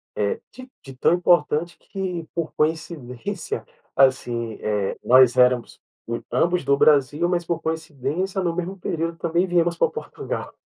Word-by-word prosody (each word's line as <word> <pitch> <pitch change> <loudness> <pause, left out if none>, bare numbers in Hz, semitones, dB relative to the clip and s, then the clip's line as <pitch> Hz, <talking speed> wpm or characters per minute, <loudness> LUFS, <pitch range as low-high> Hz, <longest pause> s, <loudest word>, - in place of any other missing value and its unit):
eh, 460 - -1
de 255 0 -12
de 135 -1 -11
tão 160 - +3
importante 175 -1 +2
que 180 -4 -5
por 165 -2 -2
coincidência, 150 -6 -3 0.3
assim, 120 -4 +2
eh, 105 -2 -1
nós 130 0 +6
éramos 125 -1 +3 0.5
ambos 180 +1 +1
do 140 - +3
Brasil, 145 +3 +3
mas 175 -1 0
por 165 -1 -2
coincidência, 160 +4 -2
no 170 -2 0
mesmo 180 +2 -4
período 165 -2 -3
também 170 +3 0
viemos 170 -1 +1
pra - - +3
Portugal. 465 - -6
165 Hz, 140 wpm, -23 LUFS, 130-175 Hz, 0.5 s, nós